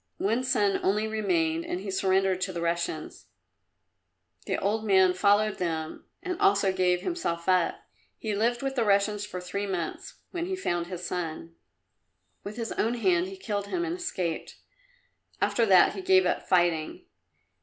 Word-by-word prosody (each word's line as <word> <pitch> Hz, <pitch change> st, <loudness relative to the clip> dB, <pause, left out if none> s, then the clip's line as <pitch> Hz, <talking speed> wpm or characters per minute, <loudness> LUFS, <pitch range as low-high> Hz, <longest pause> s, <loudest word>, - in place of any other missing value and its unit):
One 225 Hz, +6 st, 0 dB
son 210 Hz, -6 st, +1 dB
only 210 Hz, +3 st, +1 dB
remained, 170 Hz, -7 st, 0 dB
and 180 Hz, -, -3 dB
he 195 Hz, 0 st, -5 dB
surrendered 190 Hz, -1 st, +1 dB
to 185 Hz, +1 st, -1 dB
the 175 Hz, -, -5 dB
Russians. 170 Hz, -2 st, -3 dB, 1.2 s
The -, -, 0 dB
old 215 Hz, +3 st, -1 dB
man 190 Hz, -3 st, +4 dB
followed 205 Hz, +3 st, +2 dB
them, 160 Hz, -3 st, -3 dB, 0.2 s
and 365 Hz, -2 st, -4 dB
also 195 Hz, -1 st, +3 dB
gave 180 Hz, -1 st, +2 dB
himself 185 Hz, -, -3 dB
up. 185 Hz, -2 st, +2 dB, 0.4 s
He 215 Hz, -2 st, -3 dB
lived 235 Hz, +4 st, 0 dB
with 270 Hz, 0 st, -1 dB
the 245 Hz, -3 st, +1 dB
Russians 205 Hz, 0 st, +1 dB
for 180 Hz, -, -6 dB
three 200 Hz, +3 st, -4 dB
months, 175 Hz, -4 st, -4 dB, 0.2 s
when 345 Hz, -1 st, -3 dB
he 380 Hz, -, -2 dB
found 175 Hz, -, -2 dB
his 180 Hz, -1 st, -6 dB
son. 165 Hz, -2 st, -4 dB, 0.9 s
With 210 Hz, +3 st, -7 dB
his 230 Hz, -1 st, -4 dB
own 230 Hz, +2 st, 0 dB
hand 185 Hz, -6 st, +2 dB
he 190 Hz, 0 st, -8 dB
killed 200 Hz, +1 st, -3 dB
him 345 Hz, -, -1 dB
and 340 Hz, 0 st, -2 dB
escaped. 185 Hz, -, -3 dB, 0.8 s
After 230 Hz, -2 st, +2 dB
that 185 Hz, -3 st, +6 dB
he -, -, -6 dB
gave 375 Hz, 0 st, +4 dB
up -, -, -1 dB
fighting. 175 Hz, -4 st, +1 dB
195 Hz, 165 wpm, -27 LUFS, 180-220 Hz, 1.2 s, that